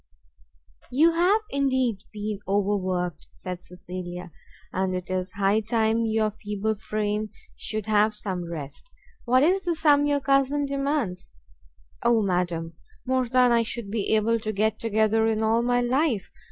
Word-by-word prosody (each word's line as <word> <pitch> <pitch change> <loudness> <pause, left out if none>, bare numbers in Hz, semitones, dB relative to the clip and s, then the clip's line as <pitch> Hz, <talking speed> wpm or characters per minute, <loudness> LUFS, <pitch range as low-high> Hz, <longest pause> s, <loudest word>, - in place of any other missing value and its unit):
"You 310 +7 +4
have 360 +6 +3
indeed 260 -6 +1
been 210 -1 -4
overworked," 185 -4 -1
said 180 -1 -6
Cecilia, 180 -1 -8 0.4
"and 185 0 0
it 180 0 -5
is 185 0 -2
high 200 +2 +2
time 225 +1 +1
your 220 -1 +1
feeble 210 0 -2
frame 210 0 -2 0.3
should 215 -2 -3
have 215 0 +3
some 185 -5 -4
rest. 150 - -7 0.4
What 255 +2 +4
is 370 +5 +3
the 345 -2 -1
sum 290 -2 +4
your 290 -1 +2
cousin 275 +1 +2
demands?" 275 - -2 0.7
"O 235 -2 +3
madam, 175 -3 -1 0.3
more 260 -1 +1
than 250 0 +4
I 235 -1 +4
should 230 -2 -4
be 220 0 +1
able 225 +2 +2
to 215 -1 -3
get 215 +1 0
together 220 0 +2
in 220 0 0
all 225 +1 +3
my 245 0 +2
life! 250 - 0
220 Hz, 150 wpm, -25 LUFS, 195-255 Hz, 0.7 s, You